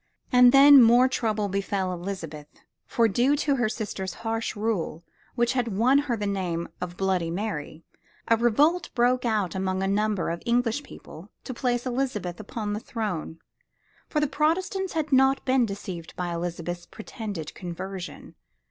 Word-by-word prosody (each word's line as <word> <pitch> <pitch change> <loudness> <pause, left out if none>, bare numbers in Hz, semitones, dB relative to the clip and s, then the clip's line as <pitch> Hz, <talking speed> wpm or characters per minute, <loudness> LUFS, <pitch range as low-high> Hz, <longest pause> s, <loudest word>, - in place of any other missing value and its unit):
And 250 0 +7
then 275 0 +9
more 240 +2 +6
trouble 215 -5 -1
befell 195 -1 -2
Elizabeth, 170 -5 -6 0.4
for 230 -1 +2
due 245 +7 +2
to 285 -1 0
her 240 -3 +1
sister's 205 -4 -4
harsh 225 0 -2
rule 205 -6 -2 0.3
which 240 0 +1
had 250 -2 0
won 255 +6 +4
her 270 -5 -1
the 205 - -3
name 180 -4 -2
of 180 0 -5
"Bloody 185 -3 0
Mary," 165 -4 -4 0.4
a 230 - +5
revolt 285 +10 +2
broke 250 +1 +2
out 210 -6 0
among 190 0 -1
a - - 0
number 205 -2 0
of 170 - -4
the - - -16
English 235 +2 +1
people 190 - -12
to 255 - -6
place 245 0 -1
Elizabeth 240 -9 -2
upon 210 0 -4
the 210 - -2
throne. 205 -9 -4 0.7
For 305 - 0
the 300 - +2
Protestants 345 +6 0
had 310 -3 -2
not 265 +1 +3
been 260 -3 +3
deceived 185 -4 -7
by 175 -1 -3
Elizabeth's 175 0 -4
pretended 205 -8 -7
conversion. 180 +1 -7
215 Hz, 160 wpm, -26 LUFS, 185-250 Hz, 0.7 s, then